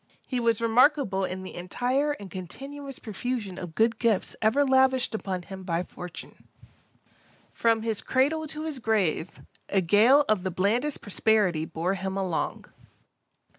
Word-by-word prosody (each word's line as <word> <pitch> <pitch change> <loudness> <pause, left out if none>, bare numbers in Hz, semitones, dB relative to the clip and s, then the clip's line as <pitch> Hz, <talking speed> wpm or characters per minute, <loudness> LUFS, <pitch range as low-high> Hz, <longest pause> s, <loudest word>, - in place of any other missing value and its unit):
He 255 - -2
was 230 -1 +1
remarkable 235 -4 +3
in 185 0 -5
the 185 - -8
entire 250 +11 -1
and 200 -9 -10
continuous 275 +10 -7
profusion 215 -3 -4
of 170 -3 -7
good 225 0 +2
gifts 225 -5 +1
ever 245 +7 +3
lavished 260 -2 +3
upon 190 -4 -3
him 190 +1 -9
by 175 -2 -1
fortune. 180 -1 -10 1.1
From 225 -1 +2
his 225 -2 -1
cradle 305 +5 +1
to 305 +1 -5
his 310 -4 -4
grave, 195 -7 0 0.3
a 195 - +3
gale 225 - +5
of 215 -3 +2
the 190 - -2
blandest 215 - 0
prosperity 205 -6 +1
bore 165 +4 -2
him 190 0 -3
along. 185 -4 -2
220 Hz, 145 wpm, -27 LUFS, 185-260 Hz, 1.1 s, gale